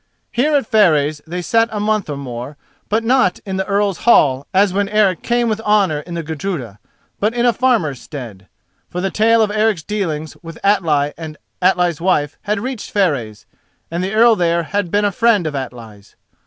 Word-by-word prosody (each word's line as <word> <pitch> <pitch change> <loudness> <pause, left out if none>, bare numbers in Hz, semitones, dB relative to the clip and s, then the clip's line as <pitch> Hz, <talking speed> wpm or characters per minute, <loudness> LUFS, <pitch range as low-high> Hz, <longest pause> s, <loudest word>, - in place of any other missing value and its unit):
Here 285 +5 +1
at 280 - +2
Fareys 155 - +2
they 175 +2 -4
sat 230 +4 +2
a 210 - -3
month 210 -3 0
or 145 - -4
more; 130 +1 -7 0.3
but 220 +2 +1
not 230 -6 +2
in 190 -1 -3
the 190 - -2
Earl's 200 -2 0
hall 140 - +3
as 195 0 +3
when 200 0 0
Eric 205 -4 +2
came 240 0 0
with 220 -1 -1
honour 205 -8 +2
in 170 +3 -8
the 165 - -3
Gudruda, 150 - -5 0.4
but 215 +3 0
in 240 0 +1
a 240 - +4
farmer's 225 - 0
stead. 115 -10 -9 0.4
For 180 - -5
the 195 +1 -1
tale 225 +1 +3
of 210 - -1
Eric's 215 -5 +1
dealings 160 -7 -3
with 165 -2 -10
Atli 155 -8 +2
and 155 -2 -7 0.2
Atli's 180 -3 +2
wife 150 -5 0
had 210 0 -1
reached 255 -2 -5
Fareys, 125 - -1 0.5
and 170 +2 -2
the 190 +2 -3
Earl 230 +1 +6
there 170 -2 +1
had 180 +4 -2
been 205 +3 +1
a 205 - +1
friend 215 -3 +2
of 155 - -2
Atli's. 115 -6 -8
185 Hz, 195 wpm, -18 LUFS, 150-215 Hz, 0.5 s, Earl